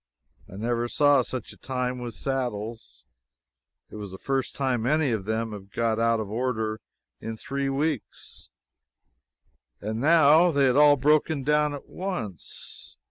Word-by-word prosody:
I - - -9
never 120 +3 -1
saw 145 +1 +4
such 125 +1 -5
a - - -18
time 125 -1 -3
with 120 -2 -6
saddles. 115 - -4 0.9
It - - -8
was 105 -2 -6
the 95 - -9
first 135 +4 -2
time 125 -4 0
any 155 -1 +2
of 105 -4 -2
them 110 +1 -2
had 100 -1 -9
got 115 -1 0
out 115 0 +2
of 110 - -3
order 110 -1 -2 0.4
in 115 0 -6
three 140 +3 -3
weeks, 145 -1 -3 1.3
and 110 +2 -4
now 160 +2 +6
they 140 -4 +3
had 130 -1 +3
all 145 0 +7
broken 150 +1 +2
down 150 +1 +2
at 140 - -10
once. 175 - -6
125 Hz, 150 wpm, -26 LUFS, 110-145 Hz, 1.3 s, all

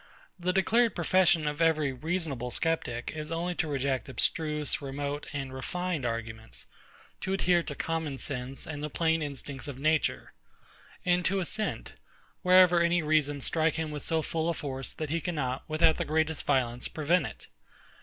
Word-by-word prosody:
The 180 +1 +1
declared 225 +5 +3
profession 175 -3 +3
of 150 +2 -2
every 155 -4 +3
reasonable 145 -3 -2
sceptic 120 -4 -1
is 155 0 -5
only 170 +2 -1
to 170 - -1
reject 135 -3 -1
abstruse, 150 +5 0
remote, 145 +1 -4
and 135 -2 -4
refined 160 +1 -2
arguments; 115 -1 -6 0.5
to 190 - -2
adhere 180 -2 +3
to - - -5
common 160 -4 -2
sense 130 -1 -3
and 145 -2 -6
the 150 - -3
plain 160 +1 +1
instincts 140 0 -5
of 140 -3 -6
nature; 155 +2 0 0.7
and 180 0 +3
to 195 +2 +2
assent, 215 +4 -2 0.5
wherever 180 -2 +6
any 170 0 +3
reasons 150 -2 +2
strike 160 -1 +2
him 160 -1 -2
with 150 -1 -5
so 160 -1 0
full 160 +1 -1
a 170 - 0
force 135 -3 -4
that 155 -2 -5
he 165 0 0
cannot, 135 -7 -2
without 155 0 +3
the - - 0
greatest 160 0 0
violence, 120 -2 +1
prevent 160 +4 +1
it. - - -10
155 Hz, 165 wpm, -29 LUFS, 140-170 Hz, 0.7 s, wherever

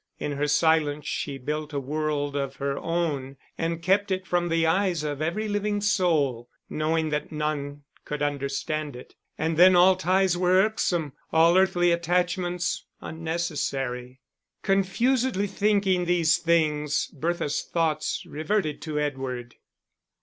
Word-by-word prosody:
In 150 - -3
her 145 +1 -1
silence 150 -1 +2
she 140 -2 -3
built 150 +3 -4
a 140 - -1
world 145 0 -2
of 140 -1 -2
her 140 0 -2
own, 150 -6 -2 0.2
and 165 0 -3
kept 200 +3 +2
it 190 0 -2
from 175 -1 0
the 165 0 +2
eyes 175 -1 +1
of 145 -1 -3
every 180 +8 -1
living 205 0 -1
soul, 155 - +1 0.2
knowing 155 +1 0
that 150 0 -3
none 145 -2 -3 0.2
could 150 0 -4
understand 145 +1 -2
it. 125 - -12 0.2
And 160 0 -1
then 180 +2 +7
all 185 +2 +6
ties 185 0 +2
were 180 +1 +3
irksome, 175 -9 -1 0.2
all 165 +2 +5
earthly 185 -2 +3
attachments 175 +1 0 0.2
unnecessary. 140 -6 -3 0.4
Confusedly 205 +3 +1
thinking 200 -2 +1
these 170 -2 +3
things, 155 -3 +1
Bertha's 165 0 -1
thoughts 165 -3 -1
reverted 155 0 -2
to 155 -2 -4
Edward. 130 -5 -3
160 Hz, 135 wpm, -26 LUFS, 145-180 Hz, 0.4 s, then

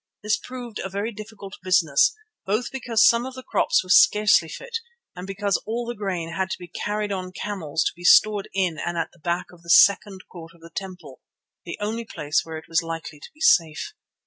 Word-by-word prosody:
This 210 +1 +2
proved 245 -4 -8
a 190 - -4
very 200 +4 -3
difficult 210 -2 -10
business, 180 - +3 0.3
both 215 +5 -1
because 235 -4 +2
some 235 0 +4
of 260 0 -7
the 260 - -9
crops - - +1
were 185 - -4
scarcely 210 -8 +5
fit 480 - -5 0.4
and 180 +1 -8
because 200 0 0
all 235 +2 -4
the 240 - -4
grain 185 -6 -4
had 190 +1 -1
to - - -3
be 180 - -10
carried 210 +4 -3
on 185 -2 -4
camels 165 -6 -3
to - - -1
be 175 - -13
stored 205 +2 +5
in 180 -5 -1
and 175 0 -3
at 165 - -2
the 175 - -23
back 170 +3 -2
of 175 - -17
the 170 - -14
second 195 +1 +5
court 165 -2 -12
of 170 - -23
the 165 0 -13
temple, 180 -8 -8 0.4
the 170 - -6
only 220 +3 -3
place 155 -7 -1
where 160 -1 -7
it 160 - -10
was 165 0 +1
likely 165 -2 -7
to - - -11
be 305 - -22
safe. 165 - +3
190 Hz, 215 wpm, -24 LUFS, 170-215 Hz, 0.4 s, scarcely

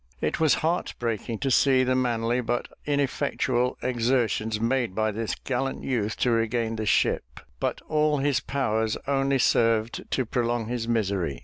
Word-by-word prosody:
It - - -1
was 160 -2 +4
heart 170 +2 -1
breaking 115 -1 -3
to 135 -1 0
see 130 0 +4
the 130 0 +1
manly 120 -1 +1
but 120 0 -2 0.2
ineffectual 130 -3 0
exertions 115 -3 0
made 115 -3 0
by 110 0 +1
this 110 +1 -3
gallant 135 +1 -3
youth 110 -5 -1
to 125 - +3
regain 115 0 0
the 110 -1 -3
ship; 65 -9 +1 0.2
but - - -2
all 150 -1 +2
his 140 -1 +1
powers 110 -5 -1
only 135 0 +1
served 115 -2 +1
to 130 - 0
prolong 120 0 -1
his 115 0 -3
misery. 100 - -1
120 Hz, 155 wpm, -26 LUFS, 110-130 Hz, 0.2 s, was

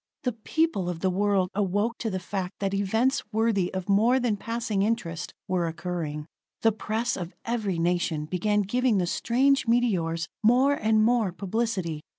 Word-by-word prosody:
The 250 - +1
people 225 - 0
of 170 -2 -5
the 190 - +2
world 195 -1 +1
awoke 205 +4 0
to 225 - -2
the 190 - -2
fact 185 0 -4
that 195 -1 -2
events 220 +7 +1
worthy 220 -4 +1
of 185 -1 -4
more 225 +6 +4
than 240 -4 +1
passing 230 -1 -2
interest 195 -6 -2 0.2
were 180 -3 0
occurring. 165 -3 -4 0.4
The 225 - +5
press 220 +3 -2
of 175 -1 -6
every 220 -6 -1
nation 170 -2 0
begin 205 +5 +1
giving 245 +2 +1
the 180 - +1
strange 260 +8 +2
meteors 180 -9 +1
more 250 +5 +4
and 220 -5 +2
more 230 -4 +2
publicity. 185 -4 -2
205 Hz, 165 wpm, -26 LUFS, 180-230 Hz, 0.4 s, The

